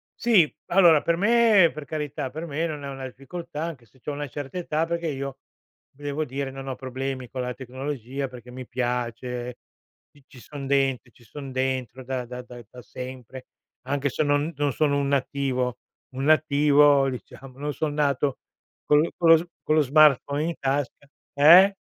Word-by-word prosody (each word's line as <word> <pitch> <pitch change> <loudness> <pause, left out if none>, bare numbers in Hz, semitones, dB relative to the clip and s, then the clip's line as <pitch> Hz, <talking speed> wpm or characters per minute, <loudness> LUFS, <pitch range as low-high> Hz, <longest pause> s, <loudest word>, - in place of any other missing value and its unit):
Sì, 205 -10 +4
allora 170 -5 +6
per 170 - +1
me, 210 -4 +5
per 150 -1 -8
carità, 150 -3 -4
per 160 +4 -6
me 160 +2 -2
non 150 -2 -6
è 140 - -5
una 135 -1 -6
difficoltà 155 +4 -7
anche 150 -8 -6
se 130 +4 -26
c'ho 150 - -5
una 145 0 -4
certa 145 +4 -7
età, 165 -2 -1
perché 170 0 -2
io 140 -2 -4 0.5
devo 145 +2 -4
dire 135 0 -4
non 135 0 -8
ho 130 - -3
problemi 130 -1 -5
con 130 - -4
la 125 0 -3
tecnologia 130 +1 -5
perché 125 -1 -12
mi 130 0 -8
piace, 125 0 -3 0.5
c 145 - -22
ci 130 - -15
son 140 -2 -8
dentro, 135 -3 +1
ci 120 - -22
son 135 +3 -9
dentro 130 -1 -2
da 130 -1 -3
da 125 +1 -7
da 120 -1 -11
da 125 - -12
sempre, 130 +2 -9 0.4
anche 140 0 0
se 155 - -1
non 145 +3 +1
non 145 -1 +1
sono 145 -2 +1
un 140 - 0
nativo, 130 -2 -1 0.4
un 135 - -3
nativo, 145 -2 +4
diciamo, 130 +1 -9
non 145 0 -3
son 150 -2 -2
nato 140 -2 +1 0.5
con 150 0 +5
l 165 - 0
con 170 - +1
lo 165 - +9
s 170 - -5 0.2
con 155 - +2
lo 155 - +5
smartphone 145 0 +4
in 170 - -1
tasca 140 +1 -2 0.3
eh? 175 +7 +8
140 Hz, 185 wpm, -25 LUFS, 130-150 Hz, 0.5 s, lo